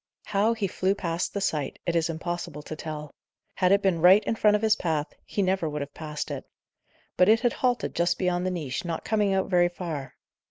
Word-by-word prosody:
How 215 +3 +2
he 215 -3 -1
flew 190 +1 0
past 170 -3 -2
the 200 - -1
sight, 150 -7 -1
it 170 - 0
is 165 0 +2
impossible 165 -2 -4
to 155 - -6
tell. 155 -1 -7 0.4
Had 185 -1 +2
it 200 0 +4
been 180 -4 +2
right 185 +5 +7
in - - 0
front 210 -1 +4
of 210 - 0
his 220 -1 +4
path, 155 -6 -2
he 200 - 0
never 185 -3 +1
would 150 0 -4
have 140 0 -6
passed 150 -2 -5
it. - - -4 0.7
But 180 +2 +5
it 225 +1 +5
had 240 - +2
halted 245 -2 0
just 170 +1 +1
beyond 180 0 0
the - - +1
niche, 150 -8 -3
not 170 -2 -4
coming 210 -2 +1
out 190 -1 +1
very 175 -2 +3
far. 160 -7 -6
175 Hz, 225 wpm, -26 LUFS, 160-200 Hz, 0.7 s, right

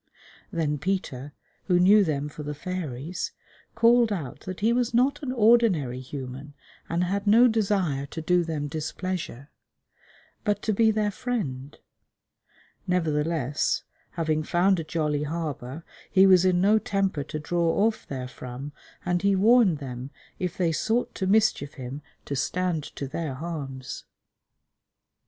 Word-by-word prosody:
Then 155 -5 -1
Peter, 145 -5 -3 0.3
who 180 -2 +3
knew 200 +3 +6
them 145 -4 -1
for 150 +1 -9
the 150 0 -5
fairies, 165 -2 -4 0.4
called 235 0 +5
out 155 -11 -4
that 185 0 -5
he 225 +3 +3
was 240 -1 0
not 270 +5 +3
an 270 -3 -3
ordinary 215 - +3
human 135 +2 -8 0.3
and 170 +1 +1
had 200 +3 -2
no 230 +4 +7
desire 195 - 0
to 160 - -7
do 175 +2 +2
them 155 -3 -3
displeasure, 160 -2 -4 0.9
but 210 -2 0
to 215 - +1
be 220 +2 +4
their 210 -1 +1
friend; 150 - -4 1.1
nevertheless, 155 -5 0 0.3
having 155 -2 0
found 175 +4 +2
a - - -2
jolly 155 -2 -1
harbour, 150 -2 -4 0.3
he 190 -1 +6
was 185 -1 +6
in 180 -1 +3
no 210 +4 +4
temper 195 -8 -1
to 155 - -5
draw 170 +5 +1
off 220 -1 -1
therefrom, 130 +1 -6 0.3
and 175 0 +1
he 200 0 +3
warned 210 -3 +5
them 130 -2 -6 0.3
if 180 -2 -3
they 175 -3 +2
sought 225 +9 0
to 190 - -2
mischief 205 -8 +2
him 130 +2 -6 0.2
to 140 - -3
stand 180 +3 0
to 140 - -6
their 145 -1 -4
harms. 135 -4 -6
170 Hz, 140 wpm, -26 LUFS, 145-200 Hz, 1.1 s, no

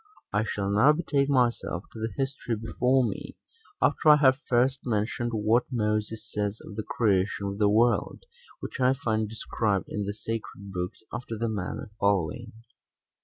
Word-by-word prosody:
I 105 +1 +2
shall 100 -2 -2
now 130 +9 +6
betake 145 -4 0
myself 120 -8 +1
to 115 - -8
the 110 0 -2
history 135 -3 -2
before 125 +4 +1
me, - - -6 0.5
after 155 - +3
I 150 - +10
have 135 -2 +4
first 130 +2 +3
mentioned 115 +1 -1
what 110 +2 +2
Moses 110 -1 -1
says 105 0 -2
of 105 - -9
the 110 - -2
creation 100 -2 +1
of 100 +1 -4
the 105 -1 +4
world, 115 - +2 0.4
which - - -6
I 130 0 +4
find 110 -4 -1
described 105 -2 -1
in 105 -1 -3
the 100 - -2
sacred 105 -3 -6
books 90 +3 -4
after 120 -1 -5
the 115 +1 -1
manner 105 +3 -4
following. 100 +4 0
110 Hz, 165 wpm, -27 LUFS, 105-125 Hz, 0.5 s, I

